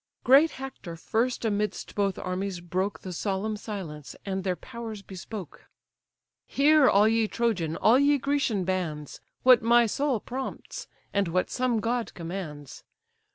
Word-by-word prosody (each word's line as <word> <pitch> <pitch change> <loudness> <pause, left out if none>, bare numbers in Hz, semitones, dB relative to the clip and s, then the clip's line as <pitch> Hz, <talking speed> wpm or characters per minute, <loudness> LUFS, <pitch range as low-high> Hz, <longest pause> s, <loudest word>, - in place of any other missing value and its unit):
Great 280 +6 +6
Hector 260 -10 -8
first 230 +8 -1
amidst 210 -1 -2
both 200 -2 0
armies 185 0 -3
broke 185 +3 -2
The 185 - -6
solemn 200 +4 -2
silence, 185 -9 -7
and 190 -1 -2
their 185 -1 0
powers 225 -2 -8
bespoke: 190 -2 -9 0.8
"Hear, 295 0 +5
all 205 +2 +5
ye 225 0 +2
Trojan, 200 -10 -1
all 230 +8 +4
ye 285 +1 +4
Grecian 275 -7 0
bands, 170 -6 -3 0.2
What 255 -2 +7
my 235 +1 +5
soul 265 +2 0
prompts, 260 +5 -6 0.3
and 200 -2 +1
what 180 +2 0
some 250 -3 +1
god 235 +1 -2
commands. 165 -5 -7
210 Hz, 140 wpm, -27 LUFS, 185-240 Hz, 0.8 s, What